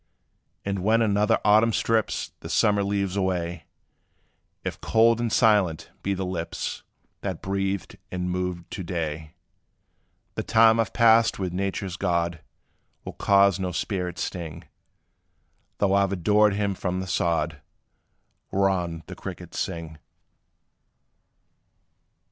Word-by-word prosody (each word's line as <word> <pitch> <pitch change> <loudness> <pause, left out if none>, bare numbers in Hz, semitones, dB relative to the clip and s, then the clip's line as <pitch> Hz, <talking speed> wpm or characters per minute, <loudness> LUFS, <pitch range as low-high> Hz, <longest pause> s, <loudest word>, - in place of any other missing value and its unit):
And 100 -1 -1
when 115 +3 +3
another 105 +1 +3
autumn 110 +2 +5
strips 115 0 0
The - - -9
summer 105 -1 +3
leaves 100 -1 -1
away, 90 -3 -2 1.0
If - - -5
cold 115 +1 +4
and 120 -2 -1
silent 100 -9 +2
be 100 0 -1
the 95 0 -3
lips 90 -1 -4 0.4
That 95 -4 -4
breathed 95 -1 -2
and 90 0 -2
moved 90 -1 -3
to 95 - -5
day, 80 -3 -4 1.0
The - - -2
time 110 0 +5
I 115 - +4
've - - -16
passed 115 -1 +5
with 95 -3 -3
nature's 95 -1 -3
God 85 -3 -1 0.6
Will - - -6
cause 100 -1 +4
no 90 -1 -2
spirit 90 0 -3
sting, 85 -4 -5 1.1
Though 100 -2 +2
I 100 0 +4
've 100 - -4
adored 105 +3 +3
him 100 -1 0
from 90 0 -3
the 95 - -3
sod 85 -4 -1 0.9
Whereon 90 -4 0
the - - -8
crickets - - -7
sing. 80 -2 -4
95 Hz, 125 wpm, -25 LUFS, 85-105 Hz, 1.1 s, autumn